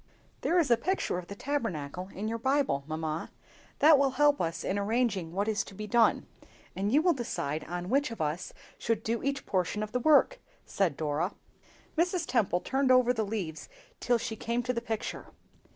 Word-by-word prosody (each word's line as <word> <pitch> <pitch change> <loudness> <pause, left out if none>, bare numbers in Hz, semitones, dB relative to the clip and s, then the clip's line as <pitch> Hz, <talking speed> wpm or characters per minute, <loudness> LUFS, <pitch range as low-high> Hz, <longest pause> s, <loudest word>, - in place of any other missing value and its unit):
"THERE 355 - +2
is 320 -8 +3
a 235 - +6
picture 330 - -1
of 175 - -10
the 200 - -7
Tabernacle 185 - -3
in 205 +3 -4
your 230 +1 -2
Bible, 265 - +1
mamma; 155 0 -3 0.5
that 300 -1 +7
will 275 -1 +4
help 290 0 +4
us 165 -1 -2
in 200 - -1
arranging 205 -5 0
what 200 +4 -1
is 210 -2 +1
to 195 - -12
be 215 - -5
done; 230 +2 +3 0.5
and 200 +2 -1
you 295 +5 +4
will 350 -1 +4
decide 160 - -3
on 175 +1 -5
which 280 +6 +2
of 230 - -8
us 155 +3 -2 0.3
should 225 -1 -1
do 230 +1 -1
each 275 0 -2
portion 190 +3 -1
of 215 - -6
the 250 - 0
work," 310 - +4 0.3
said 180 -8 0
Dora. 155 +4 -1 0.6
Mrs. 350 +1 +1
Temple 205 -10 +1
turned 270 0 0
over 250 -1 +5
the 225 - -1
leaves 195 -7 -4 0.3
till 245 -1 +2
she 225 -1 -4
came 235 +1 -2
to 250 +1 -1
the 235 - -2
picture. 225 -2 -4
225 Hz, 195 wpm, -29 LUFS, 180-265 Hz, 0.6 s, that